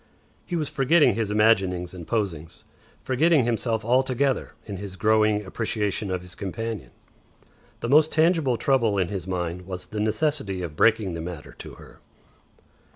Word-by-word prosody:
He 175 - -3
was 155 -3 -1
forgetting 150 0 +3
his 110 0 -2
imaginings 95 -5 +2
and 85 -3 -9
posings, 85 -8 -3 0.4
forgetting 145 +1 +3
himself 115 -1 -1
altogether 130 +2 +1
in 100 -3 -6
his 95 0 -7
growing 110 0 +2
appreciation 105 0 -2
of 90 -1 -3
his 90 0 -12
companion. 110 +2 -5 0.9
The 115 - -3
most 155 +3 +5
tangible 160 -6 +2
trouble 115 -4 +2
in 95 -3 +1
his 95 -3 -5
mind 90 -1 -3
was 90 -1 -6
the 105 - -6
necessity 110 - -1
of 80 -3 -6
breaking 110 -1 +3
the 85 - -4
matter 85 -3 -7
to - - -9
her. - - -15
110 Hz, 155 wpm, -25 LUFS, 95-130 Hz, 0.9 s, most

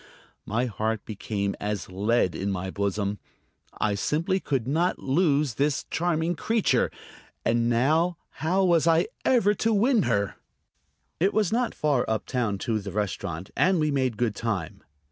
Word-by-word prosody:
My 115 +4 0
heart 110 -1 -2
became 100 -2 -3
as 105 -1 -3
lead 100 +1 +1
in 100 +1 -2
my 95 0 -3
bosom. 100 0 -1 0.6
I 105 - +1
simply 160 - 0
could 135 -9 -2
not 165 +6 +1
lose 145 -2 +1
this 140 +4 0
charming 170 0 0
creature. 220 +7 +1 0.6
And 115 0 +2
now, 155 +9 +2 0.2
how 185 +5 +2
was 170 -3 +3
I 165 +1 +4 0.2
ever 225 -5 +4
to 225 +3 0
win 225 +2 +3
her? 100 0 0 0.8
It 190 +5 +2
was 215 -4 +2
not 240 +1 0
far 145 -5 +1
up 110 -1 -1
town 120 -6 -1
to 115 -3 0
the 100 -1 -6
restaurant, 95 -3 -3
and 185 -1 +3
we 155 -1 +1
made 130 -5 0
good 120 -2 0
time. 100 -9 -3
130 Hz, 155 wpm, -26 LUFS, 105-170 Hz, 0.8 s, I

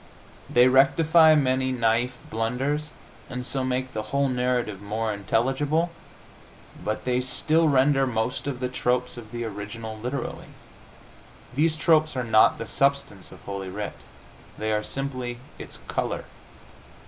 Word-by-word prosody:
They 125 +1 +6
rectify 155 +5 +6
many 130 -2 +2
naif 120 0 +1 0.2
blunders 130 +7 -1 0.4
and 125 -1 -5
so 135 +1 -1
make 130 0 -2
the 110 - -2
whole 140 0 +1
narrative 125 -5 -1
more 110 +2 -2
intelligible, 135 - 0 0.9
but 110 - -3
they 125 0 +1
still 155 +5 +2
render 135 0 +3
most 120 +3 -2
of 130 -3 -4
the 125 - 0
tropes 125 0 -1
of 115 -3 -10
the 120 0 -4
original 110 +1 -6
literally. 120 +4 -5 1.1
These 155 +4 +2
tropes 155 -2 +3
are 125 - -1
not 110 -2 +5
the 115 - -5
substance 140 -6 0
of - - -13
Holy 100 -1 -5
Writ; 105 +2 -4 0.6
they 110 0 -2
are 105 0 0
simply 130 -2 -3 0.2
its - - -7
color. - - -2
125 Hz, 135 wpm, -25 LUFS, 110-140 Hz, 1.1 s, They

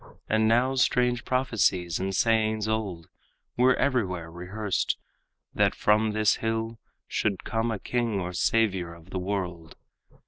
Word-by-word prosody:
And 110 0 +2
now 120 +4 +3
strange 125 -2 +2
prophecies 105 -9 +1
and 95 0 -2
sayings 110 -2 +2
old 100 -7 -2 0.5
Were 125 +1 +4
everywhere 95 -11 -1
rehearsed, 95 +4 -2 0.6
that - - +2
from 105 +1 +2
this 110 -1 +3
hill 115 0 -2 0.3
Should 100 -3 -1
come 115 +1 -1
a 110 - -1
king 115 -1 -1
or 90 -1 -4
savior 95 -4 +1
of 85 +2 -17
the 95 - -2
world. 90 -4 -4
110 Hz, 135 wpm, -27 LUFS, 90-115 Hz, 0.6 s, Were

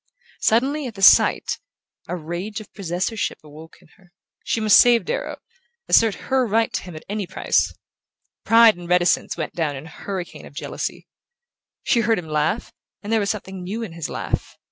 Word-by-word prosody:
Suddenly, 270 +6 +1
at 230 - -8
the 195 - -5
sight, - - +5 0.5
a - - -3
rage 175 +6 -5
of 215 - -13
possessorship 190 +3 -2
awoke 155 +2 -13
in - - -21
her. 180 -3 -24 0.3
She - - -1
must 215 -2 +6
save 240 -1 +5
Darrow, - - -3 0.5
assert 225 -3 +4
her 265 -1 +2
right 225 +2 +1
to - - -1
him 180 -3 -10
at 155 - -10
any 205 -2 -3
price. - - +1 0.7
Pride 225 -1 +6
and 175 -1 -10
reticence 180 -1 +2
went 155 - -4
down 155 -4 -1
in 135 +3 -8
a - - -11
hurricane 185 +3 -7
of - - -17
jealousy. - - -5 0.8
She 240 - +2
heard 225 -1 +2
him 175 -3 -6
laugh, 155 +9 -1 0.3
and 210 +2 -3
there 225 - +4
was 200 -1 -1
something 190 -3 -4
new 205 +6 -4
in 180 - -7
his 165 -2 -5
laugh... - - -4
195 Hz, 185 wpm, -22 LUFS, 175-225 Hz, 0.8 s, must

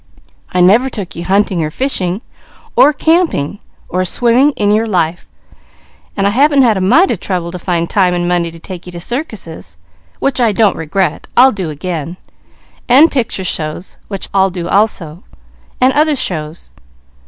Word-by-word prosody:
"I 180 - +1
never 220 +9 +4
took 195 -9 -6
you 170 - -6
hunting, 195 -3 +1
or 155 - -2
fishing, 190 - -1 0.5
or 295 - +6
camping, 310 - 0 0.3
or 185 +1 -1
swimming, 240 +8 +3
in 205 -4 0
your 220 +2 +1
life; 175 -4 -1 0.9
but 195 - 0
I 200 - +2
haven't 280 +4 +4
had 230 -4 +3
a 190 - -2
mite 280 - +4
of 215 - -2
trouble 175 -3 -3
to 180 - -7
find 170 -1 -1
time 185 -3 +1
and 175 0 -1
money 175 -1 0
to 165 - -12
take 180 +1 -9
you - - -8
to 175 - -7
circuses, 170 - -5 0.4
which 265 -2 -1
I 225 -3 +2
don't 210 0 +2
regret, 170 +4 -2
I'll 260 +2 +7
do 190 -7 -4
again; 165 +2 -5 0.7
and 280 +7 +6
picture 230 -7 -1
shows, 160 0 -4
which 195 -2 -5
I'll 195 -1 +3
do 175 -2 -5
also; 185 -5 0 0.6
and 255 +1 +3
other 300 0 +2
shows. 160 - -3
190 Hz, 170 wpm, -14 LUFS, 170-240 Hz, 0.9 s, I'll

